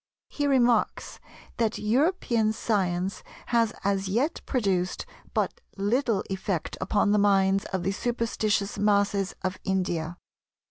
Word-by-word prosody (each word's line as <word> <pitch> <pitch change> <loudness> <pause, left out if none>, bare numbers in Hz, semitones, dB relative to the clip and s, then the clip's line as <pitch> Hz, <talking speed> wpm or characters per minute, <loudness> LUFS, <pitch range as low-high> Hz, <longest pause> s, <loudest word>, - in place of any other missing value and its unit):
He 290 -1 -1
remarks 245 -5 +2 0.4
that 225 -2 +1
"European 235 - +1
science 190 -4 -1 0.3
has 230 -2 +3
as 195 -1 0
yet 250 - 0
produced 190 -7 0 0.3
but - - -1 0.2
little 215 +1 +1
effect 190 -3 -3
upon 205 0 +2
the 210 - +4
minds 195 -1 +3
of 190 -2 -3
the 195 - +1
superstitious 215 -2 -1
masses 200 -1 +2
of 185 0 -2
India. 175 -3 -1
205 Hz, 120 wpm, -27 LUFS, 190-230 Hz, 0.4 s, the